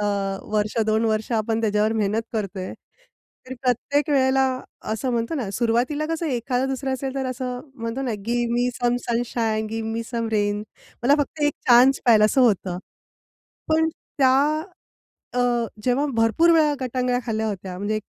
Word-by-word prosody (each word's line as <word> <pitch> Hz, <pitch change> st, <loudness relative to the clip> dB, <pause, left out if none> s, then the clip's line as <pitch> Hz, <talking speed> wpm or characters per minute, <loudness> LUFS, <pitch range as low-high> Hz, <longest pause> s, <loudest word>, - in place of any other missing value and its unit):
अ, -, -, 0 dB, 0.5 s
वर्ष 210 Hz, +1 st, 0 dB
दोन 220 Hz, +1 st, +2 dB
वर्ष 220 Hz, +1 st, 0 dB
आपण 225 Hz, 0 st, 0 dB
त्याच्यावर 215 Hz, 0 st, +1 dB
मेहनत 215 Hz, 0 st, 0 dB
करतोय. 195 Hz, -4 st, -3 dB, 0.7 s
तर 260 Hz, -, -6 dB
प्रत्येक 280 Hz, +4 st, 0 dB
वेळेला 265 Hz, -1 st, +3 dB, 0.5 s
असं 250 Hz, +4 st, -2 dB
म्हणतो 230 Hz, +6 st, -1 dB
ना, 240 Hz, -9 st, -3 dB
सुरुवातीला 245 Hz, +7 st, 0 dB
कसं 330 Hz, 0 st, -2 dB
एखादं 250 Hz, 0 st, -1 dB
दुसरा 265 Hz, 0 st, -2 dB
असेल 265 Hz, +1 st, -3 dB
तर 270 Hz, -1 st, -2 dB
असं 250 Hz, -1 st, -4 dB
म्हणतो 230 Hz, +2 st, -4 dB
ना, 250 Hz, -, -2 dB, 0.2 s
"give 240 Hz, 0 st, 0 dB
me 245 Hz, +1 st, +2 dB
some 245 Hz, 0 st, +1 dB
sunshine, 230 Hz, -2 st, 0 dB
give 225 Hz, 0 st, -3 dB
me 230 Hz, +1 st, -2 dB
some 230 Hz, -1 st, -3 dB
rain." 205 Hz, -1 st, +1 dB, 0.4 s
मला 275 Hz, +4 st, +5 dB
फक्त 295 Hz, +1 st, -2 dB
1 295 Hz, 0 st, +3 dB, 0.2 s
चान्स 250 Hz, +3 st, +6 dB
पाहिजे 215 Hz, -3 st, +6 dB
असं 260 Hz, +5 st, +3 dB
होतं. 195 Hz, -7 st, +2 dB, 0.9 s
पण 320 Hz, 0 st, +3 dB, 0.3 s
त्या 260 Hz, -2 st, +5 dB, 1.0 s
अ, 250 Hz, -, +1 dB, 0.4 s
जेव्हा 260 Hz, +4 st, +2 dB
भरपूर 225 Hz, +10 st, +4 dB
वेळा 305 Hz, -2 st, +4 dB
गटांगळ्या 250 Hz, 0 st, 0 dB
खाल्ल्या 220 Hz, -1 st, -1 dB
होत्या. 185 Hz, -2 st, -5 dB
म्हणजे 205 Hz, +2 st, -1 dB
240 Hz, 160 wpm, -23 LUFS, 220-265 Hz, 1.0 s, चान्स